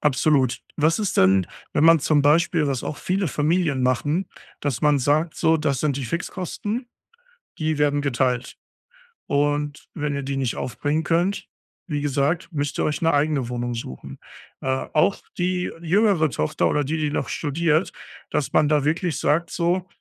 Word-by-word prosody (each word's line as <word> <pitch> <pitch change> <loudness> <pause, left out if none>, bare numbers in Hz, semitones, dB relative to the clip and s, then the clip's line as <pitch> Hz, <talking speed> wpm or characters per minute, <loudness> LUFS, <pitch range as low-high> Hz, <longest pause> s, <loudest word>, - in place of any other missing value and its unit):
absolut. 135 -2 +2 0.2
Was 160 +5 +2
ist 205 -3 -1
denn, 95 -1 +4 0.3
wenn 150 - +3
man 165 -1 +7
zum 150 0 +2
Beispiel 155 +2 +3
was 135 -3 -1
auch 150 - -4
viele 185 -1 -1
Familien 150 -1 +1
machen 145 - +1 0.3
dass 140 -5 -2
man 150 -1 +3
sagt, 150 +5 +1
so: 160 0 +3
„Das 140 -4 0
sind 145 -3 0
die 135 - -4
Fixkosten, 195 - -4 0.7
die 155 -1 -1
werden 145 0 +2
geteilt 125 -2 -1 0.7
und 145 +1 -1
wenn 150 -2 -2
ihr 140 0 -3
die 135 +1 -3
nicht 130 -3 -1
aufbringen 145 +6 -2
könnt, 175 +5 0 0.4
wie 145 -2 -1
gesagt, 145 +3 0
müsst 145 -2 -2
ihr - - +1
euch 150 - -1
'ne 165 -1 +3
eigene 145 -3 +1
Wohnung 120 0 -3
suchen.“ 65 - -8 0.4
Äh, - - -5 0.2
auch 175 +6 +3 0.2
die 180 0 -1
jüngere 180 -2 +3
Tochter 75 -10 0
oder 145 - +1
die, 155 +4 -2
die 150 -1 -1
noch - - -2
studiert 160 +3 0 0.4
dass 150 -2 -1
man 150 - +4
da 150 -1 +2
wirklich 160 +1 0
sagt, 170 +3 +1
so: 180 +1 0
150 Hz, 170 wpm, -23 LUFS, 140-165 Hz, 0.7 s, man